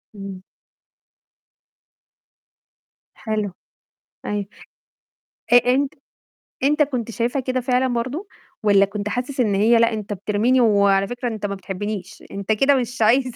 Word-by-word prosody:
إمم. 195 -2 -8 2.7
حلو. 215 -3 -3 0.7
أيوَه. 205 -1 -2 1.1
أ - - +9 0.2
أنت 280 +1 0 0.7
أنت 300 +2 +4
كنت 250 -5 -3
شايفها 240 +4 -1
كده 255 0 -1
فعلًا 250 +1 +1
برضه، 255 - -3 0.4
والّا 200 -1 +5
كنت 205 +1 -4
حاسس 255 +3 -4
إن 215 -5 +2
هي 225 +4 +4
"لأ، 230 0 +3
أنت 210 -1 -4
بترميني، 210 +6 +1
وعلى 200 -3 +4
فكرة 245 +1 -4
أنت 215 -3 -4
ما 200 - -2
بتحبنيش، 195 0 -6
أنت 200 +2 -3
كده 270 +6 +4
مش 245 -2 -2
عايز" 255 +3 +3
225 Hz, 125 wpm, -22 LUFS, 205-255 Hz, 2.7 s, أ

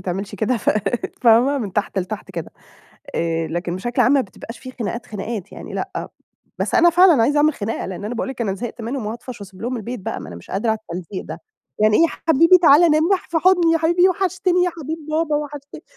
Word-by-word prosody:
تعملش 195 +2 -4
كده، 235 +3 0
ف - - +1 0.5
فاهمة؟ 245 +4 +5
من 210 -7 -4
تحت 205 0 -1
لتحت 190 +3 -5
كده، - - -6 0.6
آآ، 165 -1 -1
لكن 175 +2 -3
بشكل 240 +6 0
عام 255 - +4
ما 280 - +4
بتبقاش 230 +1 -9
في 260 - -9
خناقات 235 -1 -5
خناقات 210 -1 -6
يعني - - -9
لأ، - - -4 0.5
بس - - -2
أنا 345 0 +6
فعلًا 345 -7 +6
عايزة 285 +6 +2
أعمل 300 +1 +4
خناقة 220 -1 -4
لإن 190 +1 -6
أنا 220 +4 -4
باقول 240 - -3
لك 265 -2 -7
أنا 200 -5 0
زهقت 235 +3 -6
منهم 235 0 -4
وهاطفش 235 +2 -7
واسيب 195 -1 -11
لهم 250 +2 -2
البيت 235 +1 -5
بقى، - - -4
ما - - -9
أنا 85 - -9
مش 85 - -13
قادرة 210 +4 0
على 220 - 0
التلزيق 185 +2 -6
ده، - - -8 0.4
يعني 215 0 +4
إيه - - +5
يا - - +3 0.2
حبيبي 330 +4 +6
تعالى 325 +2 +7
نام 310 0 +3
مح 380 - -1
في 330 - +1
حُضني 350 -1 +4
يا 330 - +3
حبيبي، 345 +3 +4
وحشتني 370 -1 +1
يا 360 - 0
حبيب 320 -1 -6
بابا، 310 -1 +1
وحشتني. 290 -1 -7
245 Hz, 225 wpm, -21 LUFS, 210-320 Hz, 0.6 s, تعالى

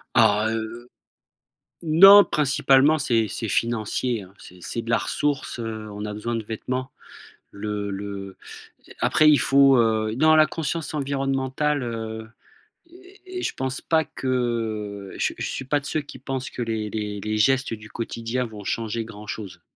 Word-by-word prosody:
Ah, 105 +2 +4
heu 115 +2 -5 1.0
non 195 +6 +9
principalement 145 +1 +3
c'est 115 -5 +1
c'est 115 - -4
financier 115 +1 -1
hein. 95 +1 -15
C'est 90 0 -14
c'est 115 +6 -4
de 115 - -6
la 115 - +4
ressource, 145 -3 -2
heu, 110 -1 -5
on 105 +1 -6
a 105 - -4
besoin 115 +3 -4
de 115 - -3
vêtements. 130 +4 -4 0.6
Le 105 0 -4
le 100 -1 -6 0.6
après 155 0 +5
il 150 - +5
faut 135 -1 +5
heu, 110 -1 +1
non 155 +3 +5
la 155 0 +6
conscience 160 -1 -3
environnementale, 135 0 -1
heu 110 -1 -5 0.6
et 370 +1 -11
et - - -4
je - - -1
pense 130 0 -3
pas 160 -1 +1
que 110 -6 -3
je - - 0
je - - -3
suis 135 - -5
pas 145 +2 +1
de 140 - -14
ceux 155 - -1
qui 140 -3 -12
pensent 135 0 -4
que - - -6
les 110 -2 -2
les 105 -2 -4
les 110 +1 -2
gestes 135 +1 +2
du 110 -1 -9
quotidien 115 +2 -3
vont 105 -3 -9
changer 115 +2 -2
grand 105 -2 -11
chose. 105 -4 -7
115 Hz, 165 wpm, -24 LUFS, 110-135 Hz, 1.0 s, non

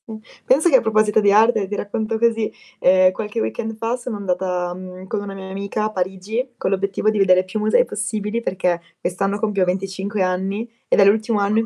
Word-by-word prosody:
Mh. 220 -1 -7 0.3
Pensa 300 +7 +4
che 270 - +7
a - - +1
proposito 215 -1 +2
di 205 -1 +4
arte, 215 -1 +4
ti 205 - -4
racconto 220 +2 -2
così, 225 -1 +1 0.3
ehm, 185 0 +5
qualche 210 +2 -4
weekend 110 - -3
fa 225 +2 -1
sono 245 -2 -5
andata, 180 -2 -2
mhmm, 185 0 -10
con 210 +1 -2
una 200 -1 -6
mia 190 -1 -8
amica 200 +2 -3
a 215 - -2
Parigi, 200 +6 -3
con - - -1
l'obiettivo 200 +2 0
di 215 - 0
vedere 185 -1 +5
più 185 +4 -4
musei 215 - +3
possibili, 215 - -3
perché 180 -5 -1 0.2
quest'anno 195 +3 -1
compio 205 -3 +1
25 195 +2 -2
anni 190 +5 -2 0.2
ed - - +2
è 200 - +7
l'ultimo 215 +2 +2
anno 205 +2 +2
in 225 - 0
200 Hz, 205 wpm, -21 LUFS, 190-220 Hz, 0.3 s, che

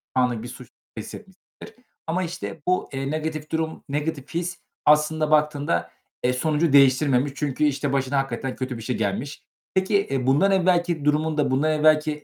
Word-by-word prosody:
anlık 125 -3 +1
bir - - -6
suç 125 -1 -11 0.3
hissetmişsindir 195 - -11 0.2
ama 180 +3 0
işte 165 -2 -6
bu, 180 0 +1
eee, 135 +1 -3
negatif 155 0 -4
durum, 160 0 -2
negatif 145 -1 -3
his 175 +1 -3 0.3
aslında 150 +1 +3
baktığında, 150 -1 +1 0.3
eee, 125 - +2
sonucu 150 +3 0
değiştirmemiş 135 0 +4
çünkü, 145 -1 -2
işte, 145 -1 0
başına 135 0 0
hakikaten 135 -1 -3
kötü 130 -2 -4
bir - - -8
şey 125 +2 -2
gelmiş. 110 +7 -3 0.3
Peki, 200 +2 +2
eee, 130 -2 -2
bundan 165 +9 +4
evvelki 175 -4 +1
durumunda, 150 -1 +1
bundan 145 +4 +2
evvelki 155 0 +2
150 Hz, 155 wpm, -24 LUFS, 135-160 Hz, 0.3 s, değiştirmemiş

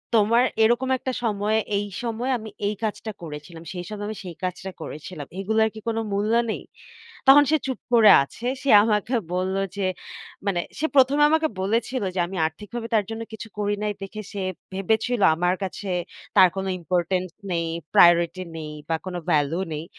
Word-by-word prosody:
"তোমার 225 +3 +4 0.2
এরকম 240 +4 +2
একটা 260 - -3
সময়ে, 215 0 +1 0.2
এই 205 - -1 0.2
সময়ে 235 +2 -2
আমি 220 -1 -8 0.2
এই 210 - -1
কাজটা 220 0 -3
করেছিলাম। 160 +1 -9
সেই 180 -1 -5
সময় 210 -1 -5
আমি 215 - -5
সেই 175 -3 -8
কাজটা 185 +1 -3
করেছিলাম। 150 -1 -7
এগুলার 220 +3 +2
কি - - -7
কোন 225 0 0 0.2
মূল্য 205 +3 +1 0.2
নেই?" - - -5 0.6
তখন 275 +2 +9
সে 315 - +5
চুপ 260 -2 -3
করে 225 -3 +8
আছে, 230 - -8 0.2
সে 275 - +1
আমাকে 215 +3 0 0.2
বলল 185 +1 -1 0.2
যে 200 - -1 0.6
মানে 180 -3 +1 0.2
সে 315 - +1
প্রথমে 280 +2 +5
আমাকে 315 0 +3
বলেছিল 230 +5 0
যে 185 - 0
আমি 190 +2 -7
আর্থিকভাবে 210 +8 -6
তার 215 -2 +3
জন্য 225 0 -4
কিছু 220 +1 -7
করি 205 0 0
নাই 210 0 0
দেখে 200 +2 -6
সে 200 - -4 0.3
ভেবেছিল 220 +5 0
আমার 175 +2 +1
কাছে 195 +1 -5 0.5
তার 185 - +8
কোন 190 - -2 0.2
important 180 +1 0 0.2
নেই, 170 -1 0 0.3
প্রায়োরিটি 170 +1 +5
নেই 155 -1 -6 0.2
বা 165 - +1
কোনো 180 -1 -3
ভ্যালু 150 +1 +2
নেই। 155 +1 -4
205 Hz, 175 wpm, -24 LUFS, 180-225 Hz, 0.6 s, তখন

